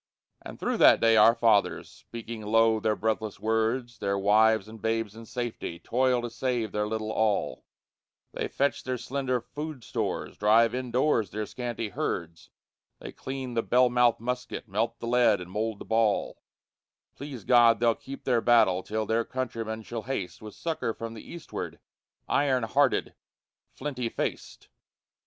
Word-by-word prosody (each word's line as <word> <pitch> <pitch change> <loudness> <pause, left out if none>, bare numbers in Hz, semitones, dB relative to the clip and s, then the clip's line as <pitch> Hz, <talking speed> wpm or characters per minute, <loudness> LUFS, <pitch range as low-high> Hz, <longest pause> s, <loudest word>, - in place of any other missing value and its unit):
But - - -9
through - - -1
that - - +7
day 115 0 +4
our 110 +2 +7
fathers, 110 -4 +2
speaking 115 -1 -9
low 110 +1 +3
their 110 0 +1
breathless 110 -2 -2
words, 115 +2 -1
Their 100 0 0
wives 110 +1 +4
and 110 -1 -11
babes 115 -2 -1
in 115 0 -11
safety, 120 -8 -4
toil 125 +4 +1
to 120 - -3
save 120 -2 -2
their 105 0 -1
little 110 0 -3
all; 110 -2 0 0.7
They - - -3
fetch 140 +1 -1
their 130 -1 -2
slender 130 0 -2
food 145 +2 -7
stores, - - -3
drive 115 +2 +4
indoors 125 -3 +1
their 105 +1 -4
scanty 120 -1 -4
herds, 85 -3 -4 0.5
They - - -9
clean 130 -2 -6
the 115 - +1
bell 125 +1 +3
mouthed 120 -1 +3
musket, 125 0 -4
melt 115 +4 -1
the - - -7
lead 120 -3 +3
and 90 0 -9
mould 110 +1 -2
the - - -10
ball; 110 -2 +1 0.7
Please 135 -6 -8
God 120 -1 +5
they'll 120 -1 +4
keep 135 +4 -10
their 120 -3 +2
battle 115 -7 +4
till 110 +2 -3
their 115 +1 +1
countrymen 115 -3 -4
shall 115 +1 -5
haste 110 -7 -4
With 110 -1 -10
succor 160 -9 -3
from 115 0 -6
the 110 - -9
eastward, 170 - -6 0.5
iron 135 -3 +2
hearted, 135 +4 +1 0.6
flinty 130 -4 -4
faced. - - -5
115 Hz, 160 wpm, -27 LUFS, 110-125 Hz, 0.7 s, that